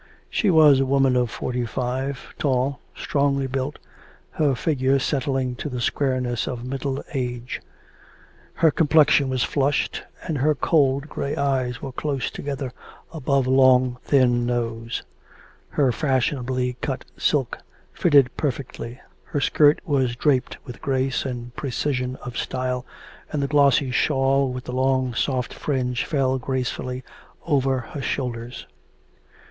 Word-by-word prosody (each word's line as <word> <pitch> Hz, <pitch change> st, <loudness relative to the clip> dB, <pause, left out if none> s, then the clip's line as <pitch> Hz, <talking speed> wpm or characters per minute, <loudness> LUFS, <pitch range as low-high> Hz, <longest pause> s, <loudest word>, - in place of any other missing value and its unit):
She 210 Hz, -, +2 dB
was 155 Hz, -5 st, +7 dB
a 135 Hz, -, +2 dB
woman 135 Hz, -1 st, +3 dB
of 125 Hz, -1 st, +2 dB
forty 125 Hz, +1 st, -3 dB
five, 130 Hz, +3 st, -3 dB
tall, 130 Hz, -1 st, +1 dB, 0.2 s
strongly 140 Hz, -1 st, 0 dB
built, 135 Hz, +2 st, -3 dB, 0.5 s
her 145 Hz, -4 st, +1 dB
figure 135 Hz, 0 st, +1 dB
setting 135 Hz, -2 st, -1 dB
to 150 Hz, -, -4 dB
the 125 Hz, -2 st, -4 dB
squareness 125 Hz, -1 st, 0 dB
of 120 Hz, -1 st, -4 dB
middle 135 Hz, +1 st, -3 dB
age. 125 Hz, -2 st, -3 dB, 0.9 s
Her 160 Hz, -, +4 dB
complexion 150 Hz, -3 st, +4 dB
was 130 Hz, -2 st, 0 dB
flushed, 140 Hz, 0 st, 0 dB, 0.2 s
and 160 Hz, -5 st, -2 dB
her 150 Hz, +3 st, +3 dB
cold 140 Hz, -1 st, +2 dB
grey 140 Hz, -2 st, -3 dB
eyes 130 Hz, -4 st, -1 dB
were 135 Hz, -, -4 dB
close 135 Hz, -1 st, -2 dB
together 140 Hz, -3 st, -5 dB, 0.4 s
above 140 Hz, -3 st, +1 dB
a 130 Hz, -, 0 dB
long 130 Hz, -1 st, +4 dB
thin 125 Hz, -3 st, +3 dB
nose. 115 Hz, -1 st, -2 dB, 0.7 s
Her 135 Hz, -4 st, +2 dB
fashionably 130 Hz, -2 st, 0 dB
cut -, -, -3 dB
silk -, -, 0 dB, 0.3 s
fitted 140 Hz, -6 st, +4 dB
perfectly; 130 Hz, -3 st, -4 dB, 0.3 s
the 145 Hz, -, 0 dB
skirt 145 Hz, +2 st, +4 dB
was 135 Hz, -7 st, +1 dB
draped 130 Hz, -1 st, +1 dB
with 125 Hz, -3 st, -9 dB
grace 135 Hz, -2 st, 0 dB
and 120 Hz, -2 st, -5 dB
precision 130 Hz, -2 st, -2 dB
of 125 Hz, -1 st, -4 dB
style, 125 Hz, 0 st, -2 dB, 0.4 s
and 150 Hz, -2 st, -1 dB
the -, -, 0 dB
glossy 140 Hz, -2 st, +3 dB
shawl 135 Hz, 0 st, +2 dB
with 125 Hz, 0 st, -5 dB
the 125 Hz, -, -6 dB
long 130 Hz, -1 st, +1 dB
soft 125 Hz, +2 st, -1 dB
fringe 125 Hz, -4 st, -1 dB
fell 130 Hz, -4 st, +1 dB
gracefully 125 Hz, 0 st, -3 dB, 0.4 s
over 135 Hz, -4 st, +2 dB, 0.2 s
her 145 Hz, -, -4 dB
shoulders. 120 Hz, -3 st, -4 dB
130 Hz, 135 wpm, -23 LUFS, 125-140 Hz, 0.9 s, was